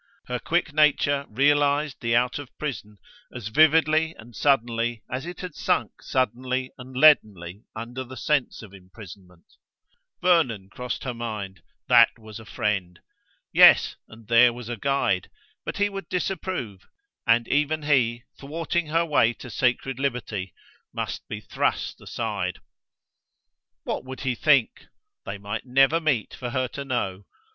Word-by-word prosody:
Her 125 0 -3
quick 165 0 -1
nature 145 -2 +3
realized 145 +3 +2
the 115 0 +1
out 125 +3 +1
of 145 -3 -9
prison 110 -8 -5 0.3
as 115 -3 -6
vividly 155 +3 +4
and 115 +1 -14
suddenly 120 -3 +1
as 130 +6 -4
it 175 - -7
had 180 -4 -6
sunk - - -1
suddenly 130 +1 -1
and 130 0 -9
leadenly 105 - +3
under 120 +4 -6
the 130 +1 -11
sense 145 -1 -1
of 100 -3 -13
imprisonment. 95 -2 -14 0.7
Vernon 130 - +2
crossed 125 +4 -5
her 125 - -3
mind: 105 -6 -6 0.3
that 120 -1 +6
was 110 -1 -11
a 110 - -12
friend! 95 -5 -2 0.5
Yes, - - +7
and 110 -1 -15
there 120 +1 +6
was 120 -1 -9
a 120 - -2
guide; 115 -7 0 0.4
but - - -4
he 205 0 +2
would 195 -1 -7
disapprove, 180 - -3 0.4
and 115 0 +3
even 150 +2 0
he, 120 -5 +2 0.2
thwarting 165 +3 -2
her 165 +2 +1
way 130 -7 +3
to 120 - -11
sacred 130 +1 0
liberty, 115 - -3 0.4
must - - -5
be - - -6
thrust - - -2
aside. 100 -6 -3 1.3
What - - -3
would 130 0 -8
he 130 -2 0
think? 140 -1 +2 0.4
They 100 0 -4
might 105 +5 -6
never 135 +5 +4
meet, 145 -9 0
for 125 - -5
her 130 0 -1
to 140 - -6
know. 100 -8 -3
125 Hz, 145 wpm, -25 LUFS, 110-145 Hz, 1.3 s, Yes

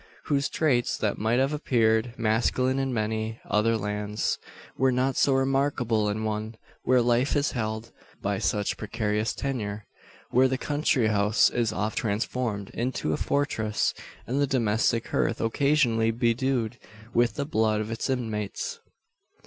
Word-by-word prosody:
Those 140 -1 +1
traits, 130 -7 +1
that 105 - -1
might 110 +3 +1
have 135 +3 +2
appeared 115 -5 +1
masculine 120 +4 +1
in 135 -1 -1
many 110 0 -2
other 115 +2 +2
lands, 105 0 -2 0.4
were 130 +1 +3
not 130 +2 +1
so 140 - +3
remarkable 135 -5 +1
in 110 +1 -2
one, 110 +1 -3 0.3
where 125 -1 +3
life 120 +3 +2
is 145 0 +1
held 110 -1 -3 0.3
by - - -1
such 105 -1 0
precarious 105 0 -1
tenure; 110 -7 -3 0.5
where 130 +2 +5
the 130 0 -1
country 145 -4 +1
house 105 +1 +3
is 115 -3 0
oft 105 0 -2
transformed 105 -1 -2
into 120 -10 -2
a - - +2
fortress, 110 - 0 0.3
and 135 +4 -1
the 140 - +2
domestic 115 -2 +1
hearth 115 - 0
occasionally 115 -2 +2
bedewed 120 0 0 0.3
with 120 0 +2
the 140 - -2
blood 110 -6 +1
of 110 +1 -3
its 115 +4 -3
inmates! 110 -6 -3
115 Hz, 145 wpm, -27 LUFS, 110-130 Hz, 0.5 s, where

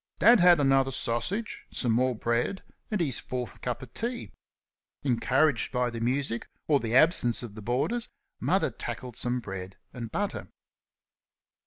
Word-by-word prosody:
Dad 235 -1 +7
had 175 -2 +7
another 135 -1 +3
sausage, 135 - -2
some 120 - 0
more 125 +2 +2
bread, 120 - -1 0.3
and 210 - -1
his 145 -8 0
fourth 125 -2 -5
cup 125 0 -3
of 125 -1 -12
tea. 240 +1 -4 0.7
Encouraged 130 +1 +2
by 125 -1 0
the 115 0 -5
music 125 0 -1 0.2
or 145 -2 +4
the 115 -1 -2
absence 130 -6 +4
of 115 -4 -7
the 110 - -9
boarders, 135 - -1 0.3
Mother - - +1
tackled 125 -3 -6
some 125 0 0
bread 95 -4 -7 0.2
and 115 -3 -6
butter. 205 0 -3
125 Hz, 150 wpm, -28 LUFS, 115-155 Hz, 0.7 s, Dad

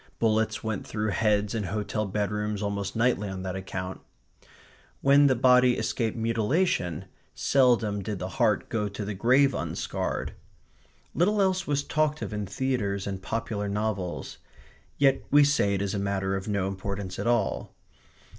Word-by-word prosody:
Bullets 110 -1 +1
went 110 -3 -3
through 105 0 -2
heads 105 +1 +1
in 110 -3 -2
hotel 105 +2 -2
bedrooms 105 +1 -2
almost 100 -1 -3
nightly 115 -3 +1
on 95 -1 -5
that 95 -1 -4
account. 95 0 -5 1.0
When 140 +1 +6
the 130 - +3
body 125 0 +5
escaped 115 -1 -1
mutilation, 115 - 0 0.3
seldom 120 -6 +2
did 105 +1 -4
the 90 - -4
heart - - +2
go 105 -2 -1
to 100 +1 -5
the 105 - -3
grave 130 +7 +4
unscarred. - - -3 0.8
Little 205 +5 +2
else 190 -1 +1
was 145 -1 0
talked 150 0 0
of - - -5
in 105 -1 -3
theatres 100 -4 -1
and 95 -1 -4
popular 105 -1 -3
novels. 100 -3 -3 0.6
Yet 135 -1 +3
we 145 0 +6
say 120 -9 +2
it 100 - -1
is 100 - -2
a 100 - -1
matter 95 -1 -1
of 95 +1 -4
no 100 -3 0
importance 95 -1 -5
at 105 - -2
all. 120 -4 0
105 Hz, 155 wpm, -27 LUFS, 100-125 Hz, 1.0 s, When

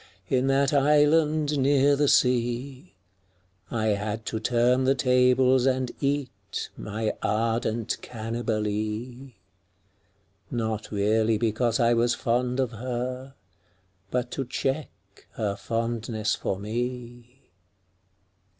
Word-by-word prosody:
In 130 0 +2
that 135 +1 +2
island 150 +1 +3
near 140 +1 +4
the 145 +1 +2
sea, 125 - +1 0.7
I 110 -1 0
had 105 +2 -2
to 110 - -3
turn 125 +3 +2
the 135 +1 +3
tables 125 0 +3
and 130 -1 0
eat 130 -9 -3
My 110 +1 -3
ardent 115 0 -1
Cannibalee 115 +2 -3 0.5
— 95 +2 -41
Not 110 -3 -3
really 110 +2 +2
because 115 +2 0
I 120 0 +4
was 120 +1 +2
fond 125 +1 0
of 130 -3 0
her, 125 +3 -5 0.7
But 125 +1 -2
to 135 - -2
check 135 +4 -2 0.4
her 105 -3 -2
fondness 115 0 -2
for 95 - -2
me. 120 +3 -5
120 Hz, 105 wpm, -26 LUFS, 110-130 Hz, 0.7 s, near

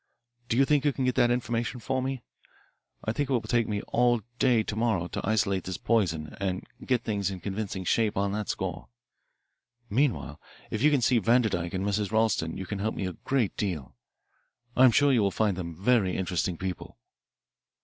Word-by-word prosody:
Do 115 - +1
you 135 - +5
think 145 -1 +2
you 145 - +3
can 130 - -1
get 125 - +2
that 120 - +3
information 120 0 -1
for 130 +3 -1
me? 130 -2 -3 0.8
I 110 - +1
think 145 +3 -2
it - - +1
will 125 - +3
take 120 -1 +1
me 105 -1 -2
all 120 -1 +2 0.2
day 120 -4 +4
to 105 - -4
morrow 110 -6 0
to - - -4
isolate 100 -4 +1
this 95 - -4
poison 80 -10 0
and 95 -2 -2 0.2
get 125 -3 0
things 100 -3 -1
in 95 -2 -6
convincing 95 +1 -4
shape 105 +3 +1
on 100 0 +1
that 105 0 -3
score. - - -3 1.0
Meanwhile 130 +3 0 0.3
if 110 - -2
you 150 - +6
can 145 -4 +2
see 120 0 +3
Vanderdyke 110 -6 +1
and 95 +1 -1
Mrs. 100 0 -1
Ralston 110 -7 +1
you 95 - -5
can 100 +1 -4
help 110 +2 -1
me 95 - -3
a 95 - -3
great 130 -2 -1
deal. 80 - -3 0.8
I 130 - +7
am 125 - +7
sure 145 +3 +4
you 120 - +4
will 100 - +3
find 105 0 0
them 85 -2 -5
very 100 0 +2
interesting 90 -1 -1
people." 95 -7 -5
110 Hz, 200 wpm, -28 LUFS, 95-120 Hz, 1.0 s, I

